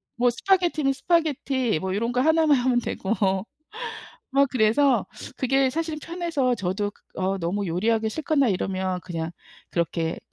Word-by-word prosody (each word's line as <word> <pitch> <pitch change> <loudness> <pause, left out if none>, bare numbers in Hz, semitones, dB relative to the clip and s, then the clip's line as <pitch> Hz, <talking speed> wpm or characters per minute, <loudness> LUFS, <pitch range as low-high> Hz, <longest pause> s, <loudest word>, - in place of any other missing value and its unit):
뭐 245 +1 +3
스파게티는 330 0 +2
스파게티 270 - +1
뭐 190 +2 -2
요런 230 +3 0
거 250 - +2
1 320 +2 +4
만 290 -3 +5
하면 245 0 +2
되고 215 -3 -2 1.2
막 275 +1 +4
그래서 255 +3 +3 0.4
그게 265 +1 +3
사실은 315 +1 -3
편해서 330 -7 -1
저도 200 +1 -2
그 - - -29 0.2
어 190 +1 0
너무 190 +4 -1
요리하기 220 +6 +1
싫거나 300 0 +1
이러면 185 -1 -1
그냥 165 -2 -4 0.4
그렇게 165 -1 -1
245 Hz, 300 characters per minute, -25 LUFS, 190-290 Hz, 1.2 s, 만